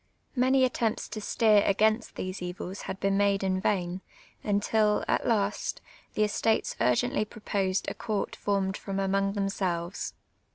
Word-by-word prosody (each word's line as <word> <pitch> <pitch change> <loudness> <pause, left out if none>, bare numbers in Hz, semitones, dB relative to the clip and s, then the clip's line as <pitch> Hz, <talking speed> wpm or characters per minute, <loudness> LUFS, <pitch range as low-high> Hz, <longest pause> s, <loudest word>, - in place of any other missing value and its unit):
Many 260 +1 +4
attempts 230 -3 -1
to 215 0 -5
steer 215 0 +4
against 215 +3 +2
these 185 0 -4
evils 180 +2 -5
had 190 - -4
been 195 0 +1
made 200 -1 +2
in 185 -1 0
vain, 185 -2 0 0.4
imtil, 210 +1 +2
at - - +1
last, 210 -3 0 0.4
the 215 - +3
estates 220 +1 +1
urgently 125 - +2
proposed 200 -3 -2
a - - -1
court 215 -4 -3
formed 195 -1 0
from 195 -1 -4
among 195 0 +1
themselves. 190 -3 -2
200 Hz, 140 wpm, -28 LUFS, 190-215 Hz, 0.4 s, Many